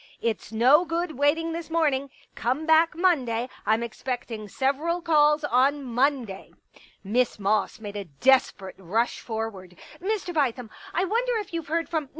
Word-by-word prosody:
" - - -34
It's 215 - -10
no 255 +9 +5
good 340 0 -2
waiting 305 +5 +1
this 330 0 -5
morning. 290 -4 +1 0.2
Come 260 +7 -2
back 320 +1 +4
Monday; 260 -10 +1 0.2
I'm 220 +2 +2
expecting 235 -2 -5
several 280 - -1
calls 300 -2 +3
on 280 +1 +2
Monday." 245 -5 -1
i6s - - -27 0.2
Pictures - - -22 0.2
Miss 235 +3 0
Moss 205 +3 0
made 205 -2 -8
a 200 -1 -4
desperate 190 - +1
rush 215 +6 -1
forward. 220 -6 -6 0.2
" - - -18
Mr. 390 -2 -2
Bithem, 250 -6 -1 0.2
I 360 +3 0
wonder 470 +4 0
if 415 -5 -6
you 335 - -1
Ve - - -19
heard 330 +2 -1
from 310 -5 -3
270 Hz, 170 wpm, -26 LUFS, 225-330 Hz, 0.2 s, no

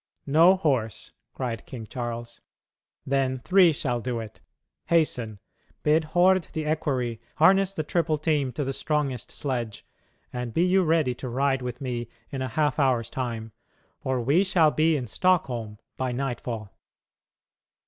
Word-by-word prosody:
"No 165 +6 +6
horse!" 130 - -1 0.2
cried 120 -4 -4
King 120 -4 -7
Charles; 120 0 -6 0.6
"then 135 -1 +1
three 180 +6 +5
shall 125 -5 -2
do 120 0 -2
it. 110 -2 -9 0.5
Hasten; 125 -10 +1 0.5
bid 155 +1 +3
Hord 180 +2 +3
the 155 -1 -2
equerry 135 -7 -1
harness 190 +4 +5
the 155 - -1
triple 155 0 0
team 150 -4 0
to 145 - -2
the 135 0 -2
strongest 140 -5 -1
sledge, 120 -6 -4 0.5
and 125 -2 -4
be 170 - +4
you 190 +1 +4
ready 160 -6 +2
to 125 +1 -7
ride 135 +2 +1
with 125 0 -5
me 120 -3 -3 0.2
in 135 - -4
a 130 - -1
half 150 +4 0
hour's 125 -5 +2
time. 115 -4 -4 0.5
For 130 -1 -1
we 140 +10 +3
shall 170 -5 +4
be 155 +1 +2
in 130 - -3
Stockholm 120 - 0 0.2
by 130 -1 -1
nightfall." 120 -5 -4
135 Hz, 150 wpm, -26 LUFS, 120-155 Hz, 0.6 s, No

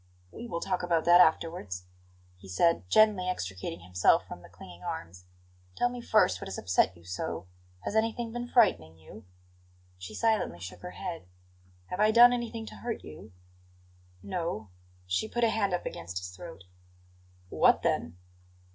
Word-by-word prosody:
"We 235 - -8
will 170 -5 -4
talk - - -1
about 170 -2 +1
that 175 +1 +8
afterwards," 160 - +1 0.5
he 95 +1 -15
said, 95 - +1
gently 210 - +4
extricating 90 - -4
himself 90 +1 +3
from - - -9
the - - -15
clinging 90 -1 -13
arms. 90 +1 -6 0.5
"Tell 245 - +2
me 245 0 -7
first 215 - +3
what - - -6
has 95 - -5
upset 90 0 +1
you 85 - -18
so. 90 -1 -4 0.4
Has 205 - -4
anything 225 +1 0
been 240 0 -4
frightening 85 - +3
you?" 100 +7 -14 0.7
She 90 - -8
silently 220 - +1
shook 90 +1 -9
her 180 - -6
head. 170 - -6 0.6
"Have 180 - -4
I 215 +1 +5
done 240 +2 +8
anything 235 -2 -4
to - - -10
hurt 235 -2 -5
you?" 75 +3 -11 0.9
"No." 110 - -4 0.3
She 90 - -1
put 240 +2 -2
a 230 - +4
hand 205 -3 0
up 180 - -2
against 90 +2 -6
his 90 0 -4
throat. 165 - -10 0.9
"What, - - +4
then?" 80 +2 -1
165 Hz, 165 wpm, -29 LUFS, -, 0.9 s, that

